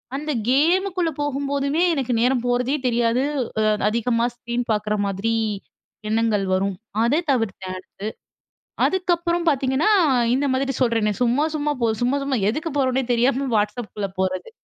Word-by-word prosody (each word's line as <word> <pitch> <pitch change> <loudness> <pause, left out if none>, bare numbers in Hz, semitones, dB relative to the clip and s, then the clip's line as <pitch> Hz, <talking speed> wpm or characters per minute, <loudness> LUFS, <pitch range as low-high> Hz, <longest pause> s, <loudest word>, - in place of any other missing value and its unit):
அந்த 300 +2 -3 0.2
கேமுக்குள்ள 350 +5 +2
போகும்போதுமே 280 +2 -1
எனக்கு 260 -4 -1
நேரம் 250 0 +2
போறதே 250 +3 +1
தெரியாது 235 +1 +1 0.4
அ - - +2 0.3
அதிகமா 235 +1 +1
ஸ்க்ரீன் 240 0 -3
பார்க்குற 210 0 0
மாதிரி 200 +4 -1 0.8
எண்ணங்கள் 220 -2 +1
வரும். 195 +1 0 0.3
அத 285 +8 +2
தவிர்த்தேன் 200 -6 -2
அடுத்து. 185 - -10 1.0
அதுக்கப்புறம் 345 -2 0
பார்த்தீங்கன்னா 275 +6 +2 0.4
இந்த 285 +2 +1
மாதிரி 270 +1 0
சொல்றேனே 225 -4 +2
சும்மா, 250 +5 +2
சும்மா 295 -1 0
போ 235 - +2 0.2
சும்மா, 250 +3 +2
சும்மா. 275 -1 -1
எதுக்கு 310 +7 -3
போறோம்னே 260 -1 +1
தெரியாம 260 +3 +1
Whatsappக்குள்ள 210 -1 -2
போறது. 185 - -1
255 Hz, 130 wpm, -22 LUFS, 230-285 Hz, 1.0 s, கேமுக்குள்ள